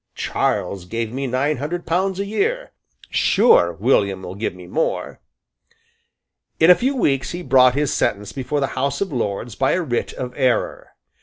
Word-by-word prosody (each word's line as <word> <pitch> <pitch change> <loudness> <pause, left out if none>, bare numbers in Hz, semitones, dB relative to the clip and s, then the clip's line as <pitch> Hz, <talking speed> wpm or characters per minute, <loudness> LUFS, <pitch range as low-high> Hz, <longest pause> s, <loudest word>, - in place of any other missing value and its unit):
"Charles 95 -3 -2
gave 115 +4 -4
me 135 +1 -3
nine 130 +4 0
hundred 165 +6 -4
pounds 185 +3 0
a 200 - -1
year. 460 - -1 0.4
Sure 190 - +4
William 100 -1 +1
will 90 - -6
give 100 -2 -4
me 90 -1 -11
more." 155 - -2 1.4
In 160 +2 +7
a - - +8
few 265 +6 -1
weeks 140 - 0
he 175 +1 -5
brought 130 -4 +5
his 145 -1 0
sentence 105 0 -1
before 140 +2 -3
the - - +2
House 140 +1 -1
of 190 -6 -2
Lords 115 -1 -3
by 135 - +1
a 185 - +1
writ 120 -6 -2
of 125 -1 -6
error. 130 -5 -1
135 Hz, 170 wpm, -21 LUFS, 115-175 Hz, 1.4 s, a